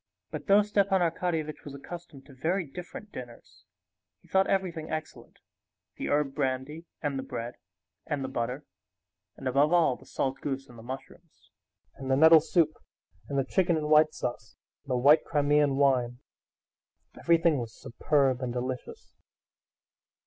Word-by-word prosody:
But 155 -2 -6
though 200 +1 +6
Stepan 200 -2 +2
Arkadyevitch 165 -2 -1
was 140 -1 -8
accustomed 155 -1 -10
to 140 - -15
very 170 +8 -1
different 180 +7 -9
dinners, 120 -2 -11 0.6
he - - -21
thought 190 0 +3
everything 175 -5 -1
excellent: 155 0 -6 0.6
the - - -3
herb 145 -2 +1
brandy, 135 +4 -2 0.2
and 140 -3 -1
the - - -2
bread, 120 -1 -5 0.5
and 145 -3 -2
the - - -2
butter, 130 +2 -3 0.7
and 135 - -5
above 140 +4 +3
all 170 -7 +4
the - - -18
salt 135 0 -2
goose 135 -1 -3
and 120 -2 -14
the - - -10
mushrooms, 135 +7 -10 0.4
and 135 0 -7
the 130 - +4
nettle 160 +1 +8
soup, 160 -1 +2 0.6
and 140 - -2
the 135 - +1
chicken 175 +2 +2
in 150 -1 -2
white 155 0 +5
sauce, 120 -3 -5 0.3
and 140 - -19
the 125 - +1
white 145 +5 +6
Crimean 145 -2 +2
wine—everything 140 +4 -1
was 115 -2 -7
superb 135 0 +1
and 125 -1 -2
delicious. 125 +1 -5
145 Hz, 150 wpm, -28 LUFS, 130-165 Hz, 0.7 s, nettle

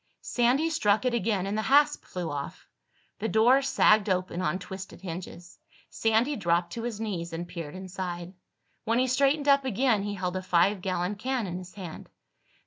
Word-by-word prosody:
Sandy 255 +7 +2
struck 210 -6 +2
it 250 - +1
again 210 -4 0
and 200 +1 -2
the 215 - 0
hasp 290 +5 +3
flew 175 -3 -4
off. 140 -1 -6 0.5
The 220 - -1
door 230 +6 +5
sagged 215 -6 +4
open 185 -1 -1
on 150 +1 0
twisted 190 +1 -8
hinges. 175 -1 -8 0.3
Sandy 225 +6 +1
dropped 175 -4 0
to 230 - -4
his 230 -3 -4
knees 185 -6 -3
and 170 +1 -4
peered 165 -3 -7
inside. 185 -1 -6 0.5
When 230 +2 +1
he 255 - +3
straightened 275 +3 +2
up 280 -1 +5
again 250 -3 +1
he 205 0 -3
held 180 -1 -3
a - - -3
five 185 +2 +2
gallon 185 +1 -2
can 250 +1 -1
in 180 -1 -4
his 185 0 -12
hand. 180 -5 -8
200 Hz, 180 wpm, -28 LUFS, 180-240 Hz, 0.5 s, door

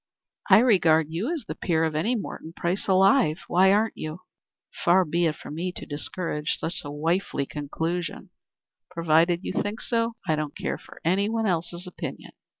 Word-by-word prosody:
"I - - +9
regard 165 -9 +4
you 195 - -2
as 330 -5 -3
the - - -3
peer 165 -2 0
of 160 -1 0
any 190 +11 +1
Morton 165 -6 -6
Price 175 +3 -2
alive. 190 - +4
Why 190 +2 +5
aren't 215 +3 +2
you?" 155 +3 -6 0.6
"Far 185 +2 +5
be 170 +2 +1
it 155 - -1
from - - -9
me 175 +4 -2
to - - -6
discourage 150 0 -2
such 165 +2 -3
a 145 - -6
wifely 155 0 -1
conclusion. 160 +4 -4 0.6
Provided 170 0 +2
you - - -3
think 205 +3 -2
so, 230 -1 -1
I 155 - +3
don't 150 -1 -4
care - - -3
for - - -15
any 195 +5 +2
one 225 0 0
else's 175 -1 -2
opinion." 180 - -7
175 Hz, 175 wpm, -26 LUFS, 160-195 Hz, 0.6 s, I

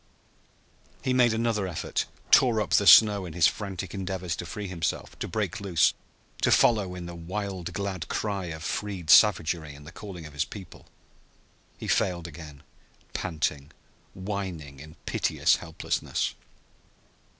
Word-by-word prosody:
He 130 - +1
made 125 -2 +4
another 110 -3 0
effort, 85 -4 -2 0.2
tore 120 -4 +6
up 105 - -2
the 100 - +4
snow 100 +2 +8
in 80 - -8
his 85 -1 +4
frantic 95 -2 -2
endeavors 95 -3 -3
to 85 - -6
free 105 +4 -5
himself, 85 -4 -3
to - - -3
break 110 0 -3
loose, 90 -5 +3 0.5
to - - +3
follow 100 -6 +3
in 90 -1 -7
the 85 - -7
wild 90 +1 -5
glad 95 -2 -3
cry 100 -3 -2
of 80 -2 -6
freed 95 -4 -2
savagery 85 -7 +4
in 75 - -13
the 80 - -11
calling 90 -5 -9
of 75 - -11
his 75 +1 0
people. 95 0 -11 0.9
He - - -7
failed 85 -2 +1
again, 75 -3 -11 0.5
panting, 75 -4 -2 0.4
whining 95 -8 -5
in 80 +3 -12
piteous - - +2
helplessness. - - -2
90 Hz, 145 wpm, -27 LUFS, 80-100 Hz, 0.9 s, snow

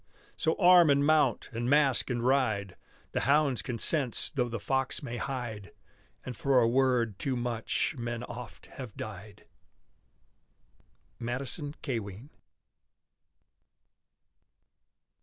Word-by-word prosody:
So 160 - 0
arm 180 -3 +6
and 140 0 +4
mount! 150 -6 +2
and 120 +2 -2
mask 140 -3 +3
and 120 -1 -2
ride! 110 -8 +1 0.4
The - - -1
hounds 140 -2 +2
can 120 - -4
sense 135 0 +1
though 125 -3 -1
the 115 -1 -4
fox 135 +3 -1
may 120 0 -5
hide! 120 -7 -5 0.5
And 125 - -5
for 135 +2 +3
a 115 - +4
word 120 -4 +1
too 135 -2 -1
much 120 +5 -1
men 120 0 -4
oft 120 -8 -9
have 125 -6 -10
died. 105 -1 -9 1.7
MADISON 135 +5 -4
CAWEIN. 115 -1 -5
125 Hz, 115 wpm, -29 LUFS, 115-140 Hz, 1.7 s, arm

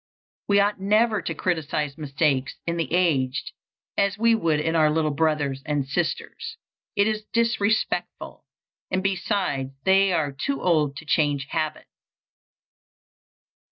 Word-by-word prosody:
We 200 0 +4
ought 205 0 +2
never 215 +1 +3
to 165 - -4
criticise 150 -4 -1
mistakes 140 -2 0
in 170 0 -1
the 165 -5 -2
aged 140 -7 +1 0.4
as 200 0 +1
we 230 +1 +4
would 165 -9 +1
in 160 +2 0
our 155 -2 +4
little 155 0 +1
brothers 145 -3 0
and 145 -3 -1
sisters: 315 - -3 0.4
it 200 - +4
is 215 0 -1
disrespectful; 230 -2 0 0.5
and 185 0 -1
besides 185 -8 -1
they 195 +2 +4
are 155 -5 0
too 275 - -3
old 155 -5 +2
to 160 - -9
change 145 -3 +1
habits. 155 -1 -2
165 Hz, 130 wpm, -24 LUFS, 150-200 Hz, 0.5 s, We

